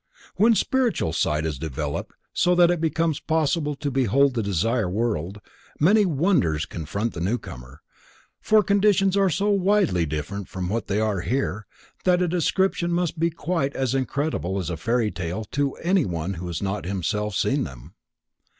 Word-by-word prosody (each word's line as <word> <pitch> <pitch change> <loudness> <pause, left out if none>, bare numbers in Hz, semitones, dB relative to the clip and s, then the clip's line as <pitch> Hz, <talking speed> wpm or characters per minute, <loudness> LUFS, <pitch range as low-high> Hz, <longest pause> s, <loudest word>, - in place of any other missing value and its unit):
_ - - -23
When 225 +2 +4
spiritual 245 - +1
sight 75 -1 0
is 75 -5 -3
developed 75 -1 -4 0.2
so 180 0 +3
that 175 -1 +5
it 175 -2 -1
becomes 160 -1 0
possible 155 -1 0
to 140 0 -3
behold 135 +2 +3
the 115 - -1
Desire 105 +2 0
World, 100 -2 -2 0.4
many 205 +6 +4
wonders 135 - +1
confront 100 +8 -4
the - - -6
newcomer, 75 - -5 0.6
for 215 -1 +4
conditions 200 -1 +3
are 195 -1 +3
so 200 +6 +1
widely 195 - +2
different 90 +7 -4
from 90 -1 -4
what 115 +2 -2
they 100 +1 0
are 105 -4 0
here, 110 0 -2 0.4
that 180 -1 +3
a 180 - +1
description 175 +1 +1
must 170 -2 -1
sound 165 0 0
quite 155 -5 -1
as 130 -2 0
incredible 135 - -1
as 90 -2 -3
a - - -2
fairy 115 +4 0
tale 90 +5 -4
to 140 -1 0
anyone 100 - 0
who 90 0 -6
has 85 -1 -4
not 100 -3 -2
himself 105 +2 -2
seen 135 +6 +1
them. 65 +2 -10
125 Hz, 170 wpm, -24 LUFS, -, 0.6 s, that